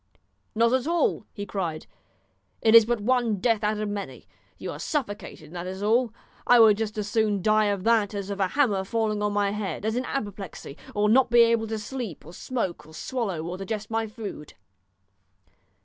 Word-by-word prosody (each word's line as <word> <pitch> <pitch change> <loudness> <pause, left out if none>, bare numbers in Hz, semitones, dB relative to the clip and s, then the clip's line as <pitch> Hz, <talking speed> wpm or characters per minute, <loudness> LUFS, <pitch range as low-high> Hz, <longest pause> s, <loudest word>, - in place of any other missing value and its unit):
"Not 230 +2 +3
at 260 +2 +1
all," 335 -9 +1
he 205 - -6
cried; 175 -6 -3 0.7
"it 220 - +3
is 230 -1 +9
but 240 -1 0
one 250 +4 +2
kind 225 -3 0
of 190 - -10
death 225 -3 +2
out 210 0 +1
of 215 0 -2
many. 205 -1 -6 0.3
You - - -5
are - - -8
suffocated, 205 - -4
that 175 0 -5
is 190 +2 -5
all. 230 +2 +2 0.4
I 245 0 +7
would 215 -2 +7
just 215 -1 -3
as 210 -1 -2
soon 210 -3 +1
die 215 0 +4
of 200 -2 -1
that 220 -2 +2
as 200 0 -4
of 200 - -4
a 190 - +2
hammer 210 -5 +1
falling 215 0 -1
on 210 0 +1
my 205 -1 +1
head, 210 0 -4
as 220 +1 0
in 250 +1 -1
apoplexy, 200 - -5 0.2
or 210 0 +2
not 245 +4 +4
to 240 - -1
be 240 - +9
able 230 -1 +3
to 220 0 -3
sleep, 215 - -6
or 165 - -11
smoke, 190 -9 -4
or 160 - -14
swallow, 200 -8 -3
or 175 +2 -5
digest 210 +2 -5
my 225 0 0
food." 210 - -8
215 Hz, 210 wpm, -26 LUFS, 200-230 Hz, 0.7 s, is